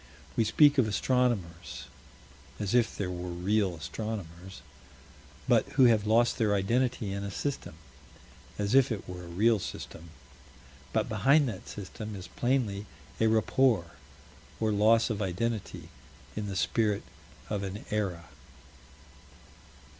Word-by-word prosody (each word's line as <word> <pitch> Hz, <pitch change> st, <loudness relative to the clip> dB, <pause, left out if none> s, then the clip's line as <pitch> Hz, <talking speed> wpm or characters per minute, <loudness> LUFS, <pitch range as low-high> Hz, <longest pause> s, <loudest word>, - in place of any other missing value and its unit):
We 115 Hz, -, +2 dB
speak 145 Hz, +5 st, +5 dB
of 120 Hz, -, +4 dB
astronomers 105 Hz, -7 st, -1 dB, 0.8 s
as 105 Hz, 0 st, -2 dB
if 120 Hz, -2 st, +3 dB
there 95 Hz, -3 st, -2 dB
were 90 Hz, 0 st, -5 dB
real 95 Hz, +2 st, 0 dB
astronomers 95 Hz, 0 st, -6 dB, 0.8 s
but -, -, +3 dB
who 135 Hz, -, +5 dB
have 110 Hz, -3 st, +4 dB
lost 120 Hz, +3 st, +3 dB
their 105 Hz, -3 st, +3 dB
identity 115 Hz, +1 st, 0 dB
in 100 Hz, 0 st, -3 dB
a 100 Hz, -, -3 dB
System 135 Hz, -, -4 dB, 0.8 s
as 105 Hz, +1 st, -1 dB
if 135 Hz, -1 st, +5 dB
it 105 Hz, -4 st, -4 dB
were 90 Hz, -1 st, -7 dB
a -, -, -11 dB
real 105 Hz, +6 st, +3 dB
System 85 Hz, -2 st, -7 dB, 0.8 s
but -, -, +1 dB
behind 140 Hz, +1 st, +4 dB
that 95 Hz, -5 st, -8 dB
System 105 Hz, +1 st, -7 dB
is 95 Hz, -2 st, -8 dB
plainly 110 Hz, -2 st, -1 dB, 0.3 s
a 110 Hz, -, +4 dB
rapport, 110 Hz, -4 st, +2 dB, 0.7 s
or 110 Hz, -1 st, +1 dB
loss 110 Hz, +3 st, +4 dB
of 105 Hz, -1 st, -2 dB
identity 105 Hz, +3 st, -3 dB, 0.5 s
in 105 Hz, -1 st, -3 dB
the 100 Hz, -, -4 dB
Spirit 105 Hz, +1 st, +1 dB, 0.5 s
of 105 Hz, -2 st, -1 dB
an 100 Hz, +1 st, -6 dB
Era. 95 Hz, -6 st, -2 dB
105 Hz, 130 wpm, -29 LUFS, 95-115 Hz, 0.8 s, speak